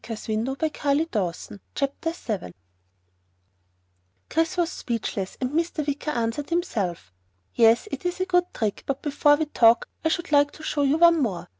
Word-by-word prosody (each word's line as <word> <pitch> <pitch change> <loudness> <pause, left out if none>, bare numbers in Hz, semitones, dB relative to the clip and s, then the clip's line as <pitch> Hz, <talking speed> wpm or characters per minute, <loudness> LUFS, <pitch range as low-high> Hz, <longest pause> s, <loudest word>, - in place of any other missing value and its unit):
asked 225 -2 -6
Mr. 230 +5 -2
Wicker 285 - 0
smiling. 190 +3 -11 0.2
CHAPTER 280 +4 -1
7 210 - -5 1.8
Chris 325 +3 0
was 345 -1 +1
speechless, 210 -5 -4
and 255 0 -2
Mr. 325 -1 -1
Wicker 290 +1 -3
answered 235 +1 -2
himself. 200 - -2 0.4
"Yes, 230 - +4
it - - -5
is 355 +1 -2
a 370 - +1
good 355 -1 +1
trick, 215 -3 -2
but 275 -1 -3
before 290 0 +4
we 315 +1 -1
talk, 235 -5 +4 0.2
I 320 - +2
should 345 0 -2
like 290 -1 +5
to 310 - -12
show 295 - -1
you 285 +2 +3
one 335 -1 +6
more." 200 -9 -2
285 Hz, 165 wpm, -25 LUFS, 225-325 Hz, 1.8 s, one